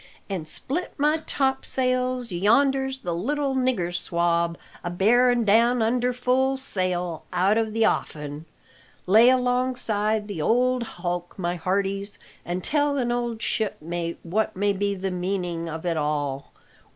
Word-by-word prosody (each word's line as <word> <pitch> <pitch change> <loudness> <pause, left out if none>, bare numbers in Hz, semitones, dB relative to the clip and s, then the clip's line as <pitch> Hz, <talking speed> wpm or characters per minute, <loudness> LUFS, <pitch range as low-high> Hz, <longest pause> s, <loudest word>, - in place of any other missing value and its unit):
An' 180 -5 -3
split 295 - -2
my 300 +2 +3
topsails, 255 -2 0
yonder's 265 +8 +2
the 175 - -3
little 275 - -1
nigger 255 -10 0
swab 170 0 0 0.3
a 175 - -2
bearin' 240 +6 +3
down 230 +3 +4
under 245 +2 +1
full 255 +2 +1
sail 180 - -2
out 190 +4 +2
o' 225 0 +2
the 225 +1 +1
offin! 150 -4 -2 0.6
Lay 220 +6 +6
alongside 245 -4 +1
the 200 -7 -4
old 250 +7 +2
hulk, 175 -5 -4
my 175 -2 -1
hearties, 195 +3 -2 0.3
an' 175 +1 -3
tell 290 - +1
an 240 -2 0
old 240 -2 -2
shipmate 170 -5 -2
what 210 +6 -1
may 200 +2 +1
be 200 +1 -1
the 190 0 -3
meaning 180 -2 -2
of 160 +2 -6
it 170 -2 0
all. 145 -2 -2
205 Hz, 140 wpm, -25 LUFS, 175-250 Hz, 0.6 s, Lay